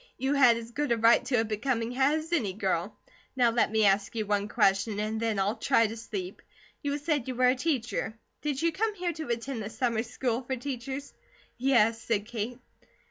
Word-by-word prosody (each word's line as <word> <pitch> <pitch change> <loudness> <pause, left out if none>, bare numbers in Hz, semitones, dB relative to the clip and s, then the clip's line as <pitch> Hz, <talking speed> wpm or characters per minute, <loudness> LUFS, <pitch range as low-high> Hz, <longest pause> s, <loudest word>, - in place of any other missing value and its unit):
"You 265 +2 0
had 250 -5 +6
as 230 0 -8
good 290 +1 -2
a 235 - +3
right 230 +2 +5
to 245 -3 +2
a - - -1
becoming 230 +2 -1
hat 265 +4 +2
as 315 +2 -4
any 220 - +1
girl. 190 -1 -2 0.4
Now 245 -3 +4
let 230 -2 +2
me 220 -1 +3
ask 200 +3 +2
you 220 -2 -1
one 205 0 0
question, 200 +1 +2
and 215 +1 -2
then 225 -2 0
I'll 200 +3 +1
try 245 -4 +3
to 220 +1 -3
sleep. 200 -5 -6 0.4
You 285 0 -1
said 290 -4 -1
you 255 - -3
were 250 +1 +4
a - - +4
teacher. 250 -6 -2 0.2
Did 290 -3 -2
you 335 - +3
come 425 +5 -1
here 355 -2 -2
to 315 -1 -6
attend 235 +1 -3
the 210 - -5
Summer 230 -1 0
School 245 +1 -2
for 260 +1 -3
Teachers?" 265 +2 -5 0.5
"Yes," 230 -4 +3
said 215 -3 -1
Kate. 235 +1 -4
235 Hz, 210 wpm, -28 LUFS, 220-270 Hz, 0.5 s, had